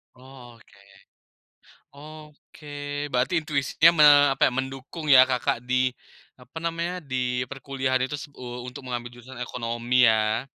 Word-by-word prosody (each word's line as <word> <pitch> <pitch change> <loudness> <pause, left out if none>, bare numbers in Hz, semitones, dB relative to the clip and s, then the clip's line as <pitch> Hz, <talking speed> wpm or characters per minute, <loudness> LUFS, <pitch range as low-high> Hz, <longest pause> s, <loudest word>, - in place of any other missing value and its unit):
Oke. 125 -4 -16 1.2
Oke, 150 0 -14 0.4
berarti 135 +6 0
intuisinya 155 +1 +2
me 150 - +6 0.3
apa - - +3
ya, - - -11
mendukung 135 +5 -6
ya 130 -3 +8
Kakak 125 -2 -1
di 130 0 0 0.4
apa 125 +5 -14
namanya, 170 +2 -3
di 125 -4 -3
perkuliahan 130 -1 -2
itu 150 +1 -6
u 125 0 -8
untuk 125 +2 -9
mengambil 120 -1 -5
jurusan 120 +1 -13
ekonomi 120 0 -1
ya. 110 +1 +1
130 Hz, 125 wpm, -25 LUFS, 125-145 Hz, 1.2 s, ya